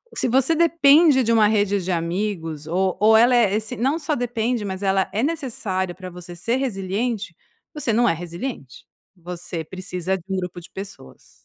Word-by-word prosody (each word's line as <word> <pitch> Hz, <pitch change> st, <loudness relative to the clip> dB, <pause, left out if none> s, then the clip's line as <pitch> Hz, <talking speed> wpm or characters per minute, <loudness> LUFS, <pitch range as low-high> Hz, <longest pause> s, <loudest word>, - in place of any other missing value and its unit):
Se -, -, 0 dB
você 265 Hz, +6 st, +3 dB
depende 310 Hz, -4 st, +5 dB
de 230 Hz, -, +1 dB
uma 215 Hz, -2 st, +5 dB
rede 205 Hz, -2 st, +1 dB
de 185 Hz, -, -2 dB
amigos, 170 Hz, -3 st, -3 dB
ou 185 Hz, +2 st, 0 dB
ou 220 Hz, +1 st, +6 dB
ela 245 Hz, +2 st, +5 dB
é 210 Hz, -4 st, +3 dB
essen 220 Hz, 0 st, -3 dB
não 270 Hz, +6 st, +1 dB
só 300 Hz, -1 st, -1 dB
depende, 240 Hz, -1 st, -1 dB
mas 190 Hz, 0 st, -5 dB
ela 190 Hz, 0 st, +1 dB
é 220 Hz, +4 st, 0 dB
necessária 220 Hz, -, -2 dB
pra 185 Hz, -1 st, -8 dB
você 175 Hz, 0 st, -10 dB
ser 230 Hz, +9 st, -1 dB
resiliente, 205 Hz, -4 st, -2 dB, 0.4 s
você 285 Hz, -6 st, -1 dB
não 240 Hz, +1 st, +3 dB
é -, -, +2 dB
resiliente, 170 Hz, -, -7 dB, 0.3 s
você 175 Hz, -1 st, -6 dB
precisa 185 Hz, +2 st, -4 dB
de 170 Hz, -, -14 dB
um 190 Hz, -, -1 dB
grupo 180 Hz, -1 st, -5 dB
de -, -, -14 dB
pessoas. 195 Hz, -, -10 dB
200 Hz, 185 wpm, -22 LUFS, 180-245 Hz, 0.4 s, ou